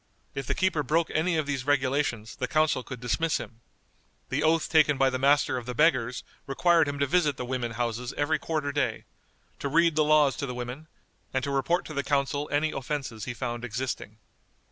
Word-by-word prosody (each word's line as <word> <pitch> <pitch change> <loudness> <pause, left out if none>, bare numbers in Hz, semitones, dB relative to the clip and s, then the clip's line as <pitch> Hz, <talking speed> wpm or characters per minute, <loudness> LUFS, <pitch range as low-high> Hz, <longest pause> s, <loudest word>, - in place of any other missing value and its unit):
If 135 -2 -5
the - - 0
keeper 190 -5 +1
broke 160 +4 +1
any 165 +2 +1
of 155 - 0
these 140 -3 -2
regulations 130 -5 0
the 125 - -3
council 155 -2 +2
could 125 0 -8
dismiss 125 +7 0
him. 115 0 -9 0.7
The 135 +3 0
oath 160 +1 +2
taken 155 -3 +4
by 135 0 +3
the 130 - -2
Master 140 0 +3
of 120 -1 -6
the 125 - -4
Beggars 130 -5 +2 0.2
required 165 +3 +3
him 145 0 -3
to 140 - +2
visit 150 -2 +2
the 125 - -4
women 120 -2 -3
houses 120 +1 -2
every 145 +1 +1
quarter 150 -2 -2
day; 140 -1 -1 0.5
to 140 - -2
read 165 +2 +3
the 155 - +4
laws 150 -3 +4
to 140 - -3
the 125 - -5
women; 125 +5 -6 0.5
and 130 - +1
to 140 - -2
report 140 +6 +1
to 155 - -7
the 140 - 0
council 145 +1 0
any 150 +2 +1
offenses 135 -5 -4
he 120 - -5
found 120 -1 -4
existing. 125 -2 -4
140 Hz, 205 wpm, -27 LUFS, 125-155 Hz, 0.7 s, taken